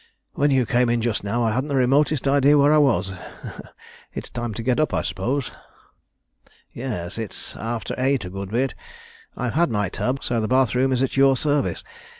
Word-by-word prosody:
When 145 +1 +2
you 130 -3 +3
came 120 +1 +2
in 120 0 +2
just 115 -2 -1
now 115 +4 -1
I 115 - +2
hadn't 130 +5 -1
the 140 - -2
remotest 135 +2 +2
idea 140 +1 +5
where 145 +1 +5
I 155 - +5
was. 115 -9 +2 1.0
It's - - -6
time 120 -1 -3
to 115 - -4
get 125 +1 +1
up, 155 - +1
I - - 0
suppose?" 120 +5 -2 1.2
"Yes, 110 -7 -5
it's 110 -3 -6
after 115 0 -4
eight 130 -4 +1
a 90 - -7
good 95 0 -6
bit. 125 +5 0 0.6
I've 125 -2 -2
had 170 +1 +2
my 105 -4 0
tub, 130 +7 -2
so 120 -2 0
the 110 - -1
bath 130 0 +2
room 130 +1 +2
is 130 0 +1
at 135 - -2
your 135 -1 +5
service. 145 +1 0
125 Hz, 195 wpm, -23 LUFS, 115-135 Hz, 1.2 s, idea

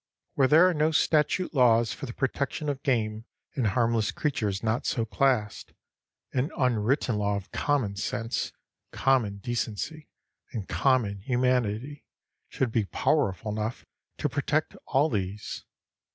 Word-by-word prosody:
Where 135 - +3
there 160 +6 +7
are 185 - +2
no 155 0 +2
statute 160 +3 +2
laws 120 -4 +4
for 140 - -7
the 120 - -6
protection 140 +3 -2
of 140 -2 -3
game 110 -5 0 0.3
and 125 -5 0
harmless 115 +1 +1
creatures 105 -9 -1
not 110 +2 0
so 115 - 0
classed, 110 0 0 0.6
an 130 +4 0
unwritten 125 -1 +1
law 100 0 +1
of 100 -2 -6
common 130 -9 0
sense, 115 +3 -2 0.4
common 120 -7 +1
decency, 120 +7 -4 0.4
and 105 -6 -4
common 120 -7 +1
humanity 125 +2 0 0.5
should 125 -3 -1
be 110 -2 +1
powerful 110 -4 0
enough 110 +3 -3 0.3
to - - 0
protect - - -1
all 140 +5 +3
these. 100 -5 -4
120 Hz, 135 wpm, -27 LUFS, 105-140 Hz, 0.6 s, there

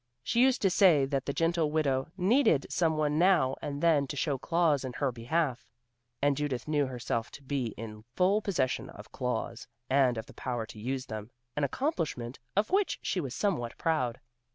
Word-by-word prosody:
She 235 - +2
used 260 -2 +3
to 195 - +4
say 175 -8 +5
that 135 -1 -2
the - - +1
gentle 165 +1 +1
widow 140 -4 +1
needed 190 - +3
some 160 -3 +1
one 150 0 +1
now 170 -8 +4
and 145 +1 -4
then 150 -5 +4
to 145 - -5
show 140 -1 -1
claws 165 -4 +2
in 130 -1 -5
her 135 0 0
behalf, 125 +3 -1 0.6
and 145 -1 +4
Judith 145 -3 -2
knew 145 -2 +1
herself 120 -2 -3
to 140 - -12
be 130 -5 -2
in 105 -1 -8
full 195 +4 +3
possession 150 -12 -1
of - - -12
claws, 125 0 -3 0.2
and 130 -3 +4
of 110 - -4
the - - -14
power 120 -3 -3
to 110 - -11
use 130 +3 -3
them, 110 0 -6 0.3
an 150 - -1
accomplishment 140 - -2 0.2
of 205 +2 +1
which 395 +1 +2
she 190 - 0
was 135 -5 -5
somewhat 120 - -1
proud. 130 -8 0
140 Hz, 190 wpm, -30 LUFS, 125-170 Hz, 0.6 s, say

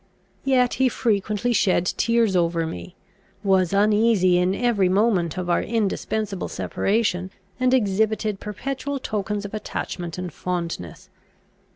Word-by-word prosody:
Yet 255 -2 +3
he 260 - +5
frequently 215 +1 0
shed 185 -5 +2
tears 230 +1 +1
over 170 -1 +1
me, 90 - -7 0.5
was 190 -3 +3
uneasy 205 -3 +3
in 180 +2 +1
every 215 -5 +2
moment 190 -4 +2
of 180 -1 -3
our 175 - +2
indispensable 215 -2 -2
separation, 195 -3 -1 0.3
and 255 0 +2
exhibited 215 -2 +1
perpetual 270 +6 -4
tokens 210 -4 -3
of 205 - -7
attachment 175 -5 -5
and 180 -3 -5
fondness. 170 - -4
205 Hz, 120 wpm, -23 LUFS, 180-225 Hz, 0.5 s, he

